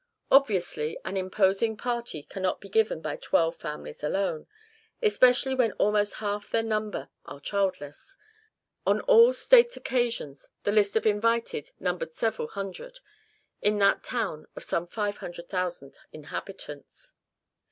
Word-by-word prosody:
Obviously, 185 - +2
an 195 - -4
imposing 195 +3 +1
party 235 -10 -3
cannot 190 +2 -2
be 200 - -12
given 215 -5 +1
by 155 -2 -4
twelve 165 0 +1
families 75 - -7
alone, 175 0 -1 0.5
especially 265 - +4
when 245 -5 +2
almost 205 0 +1
half 205 -1 -3
their 225 - +1
number 215 -1 -2 0.2
are 140 - -9
childless. 190 - -3 0.7
On - - +3
all 485 -1 +7
state - - +5
occasions 235 - -2
the 205 - +1
list 205 -1 +3
of 220 - +1
invited 225 -5 +1
numbered 175 -3 -3
several 220 -8 -1
hundred, 200 - -7 0.6
in 210 0 +2
that 200 -1 +3
town 155 -10 -3
of - - -7
some 170 +1 -2
five 205 +1 -3
thousand 175 -4 -5
inhabitants. 155 - -8
205 Hz, 130 wpm, -27 LUFS, 175-230 Hz, 0.7 s, all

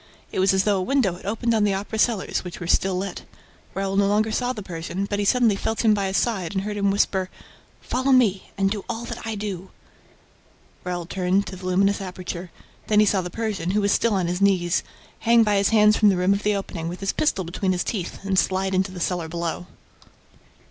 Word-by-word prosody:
It - - -3
was 190 +1 +4
as 190 0 +2
though 205 -1 +2
a - - -1
window 230 -2 +1
had 175 - -10
opened 230 +3 0
on 220 -2 +2
the 200 -2 +2
Opera 205 +3 -4
cellars, 225 -4 +1
which 180 -1 -8
were 175 - -5
still 190 +2 +2
lit. 190 0 -4 0.5
Raoul 195 0 -2
no 200 0 +3
longer 215 +2 +1
saw 245 +3 0
the 215 -5 -6
Persian, 180 +2 -4
but 205 0 -2
he 205 - 0
suddenly 235 -1 +3
felt 220 +3 -2
him 215 - +6
by 200 -2 0
his 190 - 0
side 200 -7 -1
and 190 - 0
heard 210 0 -4
him 200 -1 +2
whisper: 190 -2 +1 0.5
"Follow 260 +2 0
me 220 -8 +3
and 195 0 +1
do 205 -2 -3
all 230 0 -4
that 225 - -7
I 220 - -2
do." 195 -3 -5 1.1
Raoul 175 -1 -3
turned 185 +2 0
to 190 - -7
the 185 0 -7
luminous 195 +2 +2
aperture. 180 -1 -6 0.4
Then 210 -1 +4
he 215 - +6
saw 200 -2 +2
the 180 - -5
Persian, 210 -4 -3
who 205 +3 +1
was 200 0 +2
still 230 -3 +2
on 185 -2 +1
his 180 +2 -2
knees, 185 -3 +2 0.4
hang 230 0 +5
by 210 -2 +2
his 195 0 +3
hands 210 -1 +5
from 210 - +5
the 190 - +2
rim 180 +2 +3
of 200 - -2
the 210 0 +1
opening, 180 -4 -4
with 180 +2 -7
his 195 - -1
pistol 245 -11 0
between 180 +3 -2
his 180 -1 0
teeth, 195 -3 -4
and 190 -1 +2
slide 190 0 0
into 190 0 +1
the 185 - -8
cellar 175 -1 -1
below. 170 +1 -4
195 Hz, 235 wpm, -23 LUFS, 185-210 Hz, 1.1 s, him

